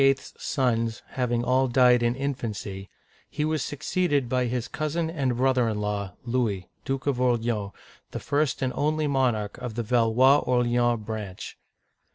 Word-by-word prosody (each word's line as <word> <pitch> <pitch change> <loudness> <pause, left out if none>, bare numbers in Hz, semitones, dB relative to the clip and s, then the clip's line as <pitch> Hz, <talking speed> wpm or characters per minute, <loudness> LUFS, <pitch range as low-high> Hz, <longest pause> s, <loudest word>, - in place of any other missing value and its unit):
*s 135 0 +2
sons 115 -4 -1
having 120 -2 -1
all 130 +1 +2
died 125 -1 +5
in 120 0 +1
infancy, 110 -8 -4 0.4
he 150 +1 -2
was 155 -2 0
succeeded 145 -2 0
by 125 +1 +1
his 120 0 -2
cousin 160 +2 -2
and 135 -7 -1
brother 130 -2 +2
in 105 -1 -2
law, 100 -2 -3
Louis, 115 -7 -1 0.2
Duke 135 0 -2
of 135 -3 0
Orleans, 115 -4 +1 0.4
the - - -5
first 145 -1 0
and 130 - -1
only 155 +1 0
monarch 125 -7 0
of 115 -3 -6
the 120 - -1
Valois 125 +4 +4
Orleans 120 -2 +1
branch. 105 -4 -6
125 Hz, 155 wpm, -26 LUFS, 115-135 Hz, 0.4 s, died